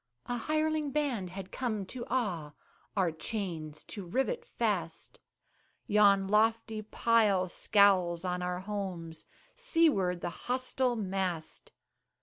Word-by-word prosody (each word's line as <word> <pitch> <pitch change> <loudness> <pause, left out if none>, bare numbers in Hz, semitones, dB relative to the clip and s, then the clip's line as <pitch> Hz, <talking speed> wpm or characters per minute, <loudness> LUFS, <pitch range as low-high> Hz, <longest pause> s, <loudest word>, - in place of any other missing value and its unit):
A 245 - -2
hireling 310 +4 0
band 270 -10 -1
had 190 +1 -8
come 215 -6 -2
to 240 +5 -7
awe, 175 - -1 0.4
Our 185 -4 +3
chains 160 -3 -4
to 200 - -7
rivet 265 - -1
fast; - - -2 0.7
Yon 200 -2 +4
lofty 220 +1 +2
pile 215 -3 +2
scowls 185 -3 +3
on 180 0 -1
our 180 0 -2
homes, 185 -5 -5 0.3
Seaward 315 - +2
the - - -2
hostile 255 +3 -1
mast. 190 -6 -3
200 Hz, 115 wpm, -31 LUFS, 180-245 Hz, 0.7 s, Yon